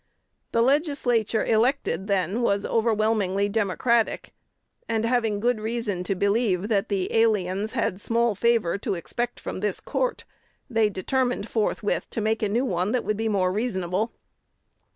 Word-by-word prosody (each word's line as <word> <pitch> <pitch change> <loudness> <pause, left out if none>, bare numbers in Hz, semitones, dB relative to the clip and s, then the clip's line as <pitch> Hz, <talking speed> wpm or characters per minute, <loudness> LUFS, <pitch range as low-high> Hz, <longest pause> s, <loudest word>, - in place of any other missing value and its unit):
The 230 - +3
Legislature 255 - +1
elected 220 - +1
then 195 +2 0
was 200 -4 +1
overwhelmingly 215 -3 +1
Democratic; 220 +3 0 0.6
and, 225 0 0
having 230 -4 +1
good 240 +1 +1
reason 220 -4 -2
to 195 - -1
believe 200 0 +1
that 210 0 +1
the 195 -3 -1
aliens 210 -2 +1
had 205 -6 -1
small 235 0 +1
favor 220 -4 +1
to 195 - -2
expect 240 +8 -4
from - - -5
this 205 -1 -1
court, - - -2 0.4
they 225 -5 +2
determined 245 +4 -1
forthwith 215 -2 -1
to - - -4
make 220 +1 0
a 210 - +1
new 235 +6 +1
one 185 -1 0
that 250 - 0
would 215 - 0
be 225 +1 -1
more 185 -3 +1
reasonable. 200 -1 -1
220 Hz, 150 wpm, -25 LUFS, 200-235 Hz, 0.6 s, The